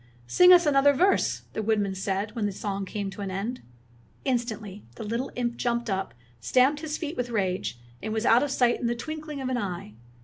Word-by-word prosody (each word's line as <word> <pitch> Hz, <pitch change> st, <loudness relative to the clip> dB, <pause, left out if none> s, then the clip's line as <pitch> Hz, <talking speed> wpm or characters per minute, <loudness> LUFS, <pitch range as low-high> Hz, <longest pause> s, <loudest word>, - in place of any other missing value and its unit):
''Sing 360 Hz, -, +7 dB
us 355 Hz, -1 st, +8 dB
another 285 Hz, -1 st, +5 dB
verse," 370 Hz, +8 st, +2 dB
the -, -, -2 dB
woodman 210 Hz, -2 st, +1 dB
said, 195 Hz, +3 st, -2 dB
when 215 Hz, -3 st, 0 dB
the -, -, -2 dB
song 195 Hz, 0 st, -3 dB
came 200 Hz, 0 st, -4 dB
to 205 Hz, -, -8 dB
an 195 Hz, -, -3 dB
end. 205 Hz, +7 st, -4 dB, 0.6 s
Instantly 220 Hz, -6 st, -2 dB
the -, -, -7 dB
little 230 Hz, +5 st, -3 dB
imp 240 Hz, -1 st, -2 dB
jumped 235 Hz, -2 st, -1 dB
up, 190 Hz, -5 st, -2 dB, 0.2 s
stamped 255 Hz, -, +3 dB
his 310 Hz, -1 st, -3 dB
feet 315 Hz, 0 st, -4 dB
with 245 Hz, 0 st, -2 dB
rage, 185 Hz, -, -1 dB, 0.2 s
and 220 Hz, -, -4 dB
was 220 Hz, +1 st, -1 dB
out 235 Hz, +2 st, +6 dB
of 290 Hz, -, 0 dB
sight 245 Hz, -3 st, +2 dB
in 240 Hz, -, -1 dB
the 240 Hz, -, 0 dB
twinkling 305 Hz, +3 st, -6 dB
of 260 Hz, -, -2 dB
an 255 Hz, -1 st, 0 dB
eye. 175 Hz, -, -5 dB
235 Hz, 210 wpm, -27 LUFS, 200-265 Hz, 0.6 s, us